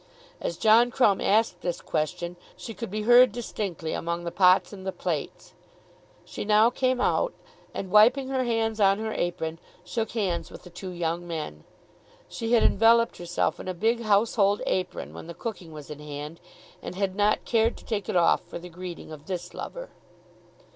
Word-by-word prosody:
As 170 - -3
John 225 +2 +5
Crumb 230 -6 +3
asked 210 -3 +2
this 175 -1 -2
question 170 +3 -3 0.2
she 225 - -7
could 230 0 -6
be 210 +2 -3
heard 245 +1 +7
distinctly 200 -7 -4
among 170 +1 -3
the 170 - -4
pots 185 +2 +4
and 190 -2 -9
the 190 - -2
plates. 175 -5 -4 0.7
She - - -6
now 215 +3 +4
came 255 -1 0
out, - - +1 0.4
and 190 - -6
wiping 245 +6 +5
her 260 -1 0
hands 225 -2 0
on 195 -1 +4
her 220 0 -3
apron, 165 -2 -3 0.3
shook 225 -1 -3
hands 190 -7 -1
with - - -12
the 180 - -13
two 185 +2 -7
young 175 0 -3
men. 150 - -6 0.6
She 230 +1 -3
had 235 - +5
enveloped 230 +2 +4
herself 175 0 -1
in - - -8
a 185 - -3
big 230 +6 +1
household 205 -1 +2
apron 185 -1 -2
when - - -9
the 170 - -8
cooking 190 -8 -6
was 150 -1 -10
in 150 - -8
hand, 150 +2 -7 0.4
and - - -7
had 190 -1 -1
not 210 +1 +2
cared 230 0 +2
to - - -15
take 205 -4 -3
it - - -2
off 170 -1 +4
for - - -7
the 175 +1 -10
greeting 175 -1 -8
of 155 -1 -11
this 175 -2 -5
lover. - - -7
195 Hz, 185 wpm, -26 LUFS, 175-225 Hz, 0.7 s, heard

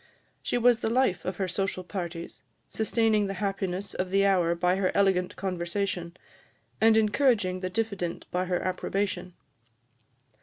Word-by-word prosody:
She - - -1
was 240 -1 +4
the 220 - -1
life 245 -5 +1
of 185 0 -3
her 190 - -1
social 185 0 -2
parties, 175 -3 -6 0.3
sustaining 220 -2 +2
the 195 - -4
happiness 195 0 -2
of 185 0 -2
the 195 +1 +3
hour 180 -4 +3
by 180 +2 +1
her 190 -1 +1
elegant 190 -2 +2
conversation, 180 -1 -3 0.6
and 220 0 +6
encouraging 215 -4 +2
the 185 0 -3
diffident 195 -4 -2
by 180 +1 0
her 180 -1 0
approbation. 185 -1 -2
190 Hz, 145 wpm, -28 LUFS, 180-205 Hz, 0.6 s, and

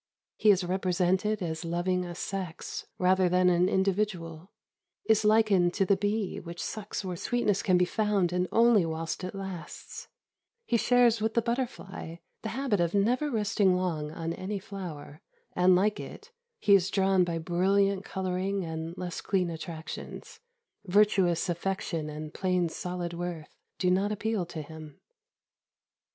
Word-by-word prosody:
He 215 - +3
is 190 -2 +5
represented 185 +3 0
as 160 -1 -3
loving 175 +2 0
a 175 -1 -7
sex 185 -2 -5
rather 185 0 +3
than 180 +1 +4
an 180 +1 +3
individual; 190 -4 -1 0.6
is 220 0 +3
likened 210 -5 +4
to 195 - +2
the 200 - +4
bee 205 0 -1
which 170 0 -9
sucks 210 -2 -4
where 180 -1 -3
sweetness 210 +1 0
can 185 -5 +3
be 180 - +4
found 200 -3 +1
and 180 0 +1
only 230 -4 +5
whilst 165 +2 -3
it 185 +2 -5
lasts; 190 -3 -7 0.6
he 240 - 0
shares 235 -1 +4
with 220 0 0
the 235 - +4
butterfly 235 -8 -4 0.3
the 220 - -4
habit 255 -5 0
of 170 +2 +1
never 245 +9 +2
resting 210 -5 +2
long 165 -5 -1
on 165 +1 -4
any 200 +4 -4
flower, 175 -7 -8 0.3
and, 180 +1 +5
like 205 +3 +2
it, 430 +3 -9 0.3
he 205 - +3
is 190 -1 +5
drawn 195 -1 +3
by 170 -1 -2
brilliant 190 +4 +1
colouring 190 0 -2
and 160 +2 -5
less 180 -1 -4
clean 185 -3 0
attractions. 160 -1 -7 0.4
Virtuous 195 -3 +3
affection 175 -3 -2
and 155 +1 -7
plain 180 -2 0
solid 175 +1 -4
worth 170 -3 -6 0.2
do 180 -1 +2
not 195 +3 +2
appeal 210 -3 -1
to 160 -2 -6
him. 155 -1 -11
185 Hz, 150 wpm, -29 LUFS, 175-205 Hz, 0.6 s, is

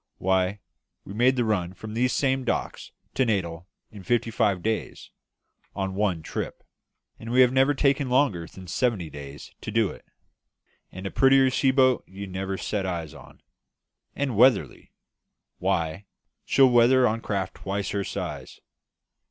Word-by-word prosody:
Why, 95 +1 0 0.4
we 100 - -8
made 125 +4 +3
the 120 -2 +1
run 95 -4 -1
from 110 +3 -8
these 125 +2 +1
same 135 -1 +1
docks 125 - -3 0.2
to 130 - +2
Natal 90 -6 -2 0.2
in 105 - -11
fifty 115 +3 0
five 105 -5 +1
days, 110 0 -3 0.6
on 95 -1 -2
one 95 -5 -1
trip; - - -5 0.6
and 115 - -8
we 125 +2 +4
have 125 -1 +5
never 135 +2 +3
taken 140 -1 +1
longer 125 - +1
than 95 - -12
seventy 90 -2 -1
days 70 0 -10
to - - -6
do 110 -2 +1
it. - - -13 0.9
And 95 +2 -9
a 95 - -3
prettier 135 0 +4
sea 135 +1 +2
boat 130 -2 +3
you 100 +2 -8
never 95 0 -4
set 105 0 -2
eyes 85 -5 -4
on. - - -15 0.7
And 140 -4 -2
weatherly 120 -1 +3 0.7
why, 90 0 -1 0.4
she'll 135 -1 +5
weather 125 +1 +5
on 115 +1 -1
craft 95 -4 -3
twice 100 +1 -3
her 100 -1 -1
size. - - -6
105 Hz, 155 wpm, -25 LUFS, 95-125 Hz, 0.9 s, have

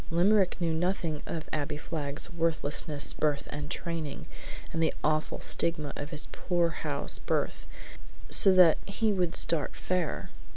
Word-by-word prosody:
Limerick 185 +3 +3
knew 170 -2 0
nothing 165 -2 -1
of 160 -1 -5
Abbie 150 0 -2
Flagg's 150 +1 -5
worthlessness, 155 -3 0
birth, 150 -2 -1
and 145 0 -5
training, 160 -5 -5 0.5
and 165 - -1
the 160 - +1
awful 155 0 0
stigma 155 -4 -1
of 145 - -6
his 150 -3 -3
poorhouse 175 -2 -1
birth, - - -2 0.6
so 195 - +9
that 180 -4 +6
he 210 +2 0
would 180 -3 0
start 165 -3 0
fair. 180 -3 -2
165 Hz, 135 wpm, -29 LUFS, 150-175 Hz, 0.6 s, so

